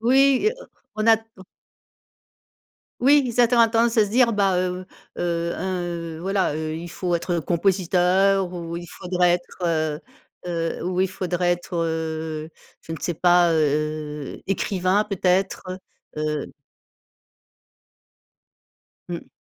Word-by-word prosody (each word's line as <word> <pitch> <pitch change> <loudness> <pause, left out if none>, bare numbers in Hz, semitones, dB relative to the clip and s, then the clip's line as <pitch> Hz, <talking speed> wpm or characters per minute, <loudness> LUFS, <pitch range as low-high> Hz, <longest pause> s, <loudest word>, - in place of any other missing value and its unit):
oui 265 +3 +4
et - - +5
heu, - - -10 0.3
on 215 - -1
a 225 -1 +7
t 225 - -15 1.8
Oui, 285 +2 +6
ils 245 0 -3
attend 240 0 +5
à 230 - +5
tendance 230 +1 +2
à 220 - +7
se - - -7
dire: 235 +1 +3
«Bah, 195 -3 +2
heu 180 0 -2 0.3
heu, 170 -1 -1
un, 185 -1 -2
heu, 170 -2 -5
voilà, 190 -2 0
heu, 155 0 -3
il 170 +1 -7
faut 175 -1 -1
être, 170 +2 -3
heu, - - +1
compositeur 185 +2 +2
ou 170 -1 -5
il 175 0 -7
faudrait 180 0 0
être, 180 +1 -10
heu 155 -2 0 0.5
heu, 165 -2 -2
ou 180 0 -1
il 190 - +3
faudrait 180 -1 -1
être, 175 0 -3
heu- 160 -1 -3 0.3
je - - -9
ne 160 - -4
sais- 175 - -2
pas, 175 0 +4
heu, 150 -1 -1
écrivain, 195 +1 +1
peut-être, 190 -1 0 0.5
heu» 150 -1 -2 2.6
Mmh. - - -6
180 Hz, 140 wpm, -23 LUFS, 165-195 Hz, 2.6 s, a